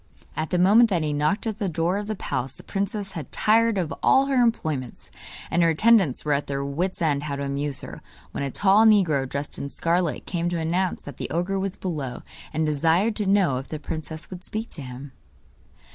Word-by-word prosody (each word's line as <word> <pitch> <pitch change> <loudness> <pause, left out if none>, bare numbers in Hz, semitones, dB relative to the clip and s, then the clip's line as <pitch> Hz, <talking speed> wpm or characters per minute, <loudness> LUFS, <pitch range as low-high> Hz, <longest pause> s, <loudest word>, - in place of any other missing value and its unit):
At 155 0 -2
the 180 - +1
moment 210 +6 +6
that 175 -5 +1
he 150 -1 -1
knocked 150 +10 0
at 220 -1 -3
the 200 -4 -1
door 170 +4 0
of 205 - -6
the 215 - -2
palace 130 -8 -3
the - - -11
princess 200 0 -3
had 155 -8 -7
tired 225 0 +3
of 170 -4 -1
all 270 - +5
her 270 -2 +2
employments, 155 - -1 0.4
and 175 - +2
her 170 - +5
attendants 190 - +3
were 150 - +2
at 140 +1 -1
their 140 0 -2
wits' 170 +6 -2
end 145 -3 +1
how 145 -1 -3
to 140 - -4
amuse 140 0 -3
her, - - -9 0.3
when - - -4
a 140 - -1
tall 200 +8 +4
negro 170 - +4
dressed 140 +2 -4
in 140 - -4
scarlet 170 +2 -1
came 175 -1 -1
to 175 - -2
announce 175 +3 -1
that 145 -3 -9
the - - -4
ogre 180 +4 -1
was 195 0 -2
below, 150 -9 -4 0.3
and 155 0 0
desired 165 +8 +2
to 210 -3 -1
know 190 -9 +3
if 135 - -9
the 155 - -5
princess 155 +1 -7
would 180 -1 -8
speak 220 +3 -5
to 155 - -6
him. 130 +1 -8
170 Hz, 220 wpm, -24 LUFS, 145-195 Hz, 0.4 s, moment